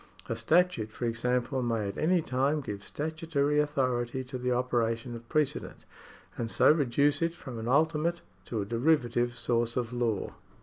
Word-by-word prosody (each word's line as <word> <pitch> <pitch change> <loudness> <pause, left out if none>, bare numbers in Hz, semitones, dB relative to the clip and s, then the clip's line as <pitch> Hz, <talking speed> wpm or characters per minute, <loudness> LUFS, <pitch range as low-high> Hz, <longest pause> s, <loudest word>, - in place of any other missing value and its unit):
A 115 - -2
statute 115 -2 +2
for 120 - -4
example 125 +2 0
may 115 -4 0
at 100 - -5
any 175 +1 +2
time 140 +4 +1
give 105 -6 -6
statutory 150 -1 -1
authority 130 -4 0
to 130 0 -6
the 125 0 -1
operation 120 -1 0
of 115 0 -11
precedent,^ 155 -2 -1 0.5
and 115 -1 -2
so - - +5
reduce 145 0 +2
it 165 0 0
from 130 -8 -8
an 110 - -5
ultimate 160 +5 +2 0.2
to 110 -4 -2
a - - -7
derivative 120 0 +1
source 115 0 0
of 120 -1 -2
law. 115 -4 -1
125 Hz, 165 wpm, -29 LUFS, 115-150 Hz, 0.5 s, so